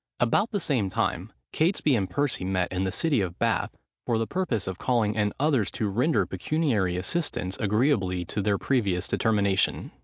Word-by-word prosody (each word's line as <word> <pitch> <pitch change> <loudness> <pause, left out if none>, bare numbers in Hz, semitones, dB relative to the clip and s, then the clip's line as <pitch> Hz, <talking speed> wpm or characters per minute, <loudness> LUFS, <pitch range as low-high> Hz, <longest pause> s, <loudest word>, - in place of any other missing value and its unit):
About 120 - +2
the 205 - -1
same 125 - 0
time, - - -2 0.2
Catesby 155 -4 +2
and 95 -5 -1
Percy 140 -2 -1
met 95 -1 -1
in 95 +1 0
the 95 - -1
city 150 - +1
of 90 -3 -4
Bath, - - 0 0.3
for 115 - 0
the 115 - 0
purpose 125 - -1
of 95 -1 -5
calling 115 -5 +1
in 105 -1 0
others 135 -8 +2
to 110 -4 -1
render 125 +11 +2
pecuniary 115 - 0
assistance 95 - -2
agreeably 100 -5 +1
to 105 - -3
their 100 0 +1
previous 100 -10 0
determination. 100 -3 +1
105 Hz, 175 wpm, -26 LUFS, 95-140 Hz, 0.3 s, About